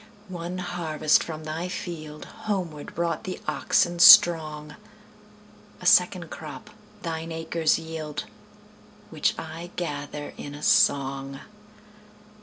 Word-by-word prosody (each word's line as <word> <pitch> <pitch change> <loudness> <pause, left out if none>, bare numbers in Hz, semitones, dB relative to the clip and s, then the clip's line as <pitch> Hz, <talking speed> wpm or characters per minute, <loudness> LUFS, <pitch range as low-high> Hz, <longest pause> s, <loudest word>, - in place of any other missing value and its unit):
One 175 0 -5
harvest 160 -4 +1
from 155 -1 -7
thy 160 +3 -4
fieldHomeward 170 +1 -6
brought 170 0 -2
the 185 - -6
oxen 175 0 +1
strong;A 155 -4 +3
second - - +3
crop - - -9 0.3
thine 165 0 -4
acres 160 0 0
yield, 160 -2 -6 0.9
Which - - 0
I 170 +2 -7
gather 145 -3 -5
in 145 0 -8
a 150 - -10
song. 135 0 +2
160 Hz, 95 wpm, -25 LUFS, 150-170 Hz, 0.9 s, strong;A